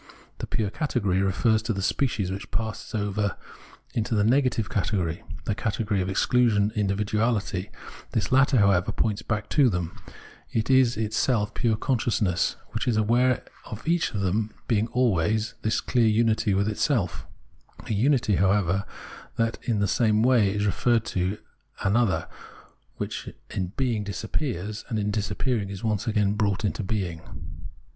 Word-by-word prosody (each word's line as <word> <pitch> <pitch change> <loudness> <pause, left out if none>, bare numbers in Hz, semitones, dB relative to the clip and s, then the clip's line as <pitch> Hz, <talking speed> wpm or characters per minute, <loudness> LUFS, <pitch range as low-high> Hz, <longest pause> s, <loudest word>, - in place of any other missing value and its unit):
The - - -4
pure 105 -3 -1
category 105 - 0
refers 110 +3 +2
to 115 +1 -2
the 95 - -3
species, 105 -6 0
which 95 +1 -6
pass 110 0 -4
over 100 -1 -1 0.6
into 115 0 -1
the 105 - +3
negative 125 -2 +2
category, 95 -3 -1 0.2
the 105 - 0
cate 110 +1 -2
gory 100 -2 +1
of 90 - -2
excluision, 105 0 +2
individuahty; 105 -1 0 0.4
this - - -1
latter, 135 0 +4
however, 100 -4 +3
points 110 -2 -1
back 105 -1 -2
to 140 -5 +4
them, 90 -4 -3 0.6
it 115 +3 0
is 130 -3 +4
itself 110 0 0
pure 115 -3 +1
consciousness, 110 -8 0 0.2
which - - -3
is 115 -3 +2
aware 120 +4 +2 0.3
in 110 - -4
each 170 +1 +1
of 100 - -1
them 105 +3 -1
of - - -32
being 110 -1 +2
always 110 -3 +1
this 110 0 +1
clear 120 -3 +2
unity 110 -2 +2
with 100 +1 +1
itself 100 - 0 0.3
— - - -19
a - - -1
unity, 115 -2 +2
however, 95 0 +2 0.5
that 115 0 0
in 115 -3 -1
the 100 - +2
same 110 -1 +2
way 120 -5 +4
is 105 +1 -1
referred 115 +2 +2
to 95 +3 -1 0.5
an 100 +2 +2
other, 120 -5 +2 0.7
which - - -4 0.2
in 95 - -2
being 120 -5 0
disappears, 105 - -3
and 110 - -1
in 105 0 0
disappearing 105 +1 -1
is 100 -2 -7
once 110 -2 -1
again 105 -2 +2
brought 105 -1 0
into 105 - -1
being. 95 -5 -3
105 Hz, 160 wpm, -26 LUFS, 100-115 Hz, 0.7 s, latter